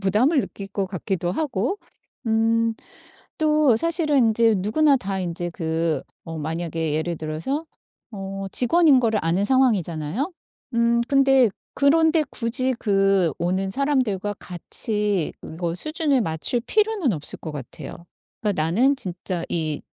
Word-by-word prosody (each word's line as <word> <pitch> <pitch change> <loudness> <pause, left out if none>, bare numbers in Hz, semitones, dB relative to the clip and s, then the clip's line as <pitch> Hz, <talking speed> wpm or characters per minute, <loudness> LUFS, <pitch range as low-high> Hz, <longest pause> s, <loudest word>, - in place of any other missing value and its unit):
부담을 225 - +3
느낄 200 -5 -7
것 200 -1 -2
같기도 185 -1 -3
하고 260 - -1 0.5
음 225 0 +2 0.7
또 305 -5 +4
사실은 320 +1 +1
인제 225 -2 +4
누구나 275 +9 +3
다 195 -4 -3
인제 175 0 -3
그 165 -1 -1 0.2
어 165 0 -6
만약에 160 0 -3
예를 165 +2 -1
들어서 160 - -3 0.5
어 195 -1 -6
직원인 290 +1 +5
거를 225 -3 +1
아는 170 +5 +1
상황이잖아요. 215 - +1 0.4
음 235 0 +3
근데 270 -3 +5 0.3
그런 320 +3 +4
데 320 -2 +3
굳이 255 +2 0
그 195 -4 +2
오는 185 +3 -1
사람들과 240 -6 0
같이 205 +1 -2
이거 170 +1 -4
수준을 305 - +1
맞출 165 +5 0
필요는 415 - +1
없을 150 -2 -5
것 160 - -6
같아요. 145 +3 -8 0.4
그러니까 205 -7 0
나는 235 - +3
진짜 180 -5 -4
이 155 -3 -2
210 Hz, 270 characters per minute, -23 LUFS, 175-265 Hz, 0.7 s, 직원인